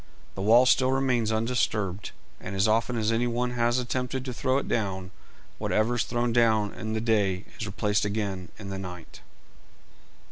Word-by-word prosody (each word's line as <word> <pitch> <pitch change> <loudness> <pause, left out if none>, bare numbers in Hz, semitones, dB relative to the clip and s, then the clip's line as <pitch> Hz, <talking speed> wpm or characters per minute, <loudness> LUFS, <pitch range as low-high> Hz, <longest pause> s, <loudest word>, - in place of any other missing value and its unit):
The 95 - -6
wall 115 +5 +6
still 130 0 +4
remains 130 -4 +1
undisturbed, 110 -4 -1 0.3
and 95 +1 -6
as 95 +3 +3
often 115 +3 +1
as 110 0 +1
any 115 +2 +1
one 120 +1 -1
has 120 0 +1
attempted 125 +1 -2
to 125 - -4
throw 130 +3 0
it - - -2
down, 95 -4 -2 0.5
whatever 110 +3 +1
is 120 - 0
thrown 120 -1 -1
down 110 -3 +3
in 110 0 -5
the 110 - -1
day 100 -4 +1
is 110 - -3
replaced 105 +1 0
again 100 -4 -3
in 100 -2 -7
the 95 - -4
night. 90 -3 -9
110 Hz, 175 wpm, -27 LUFS, 100-120 Hz, 0.5 s, wall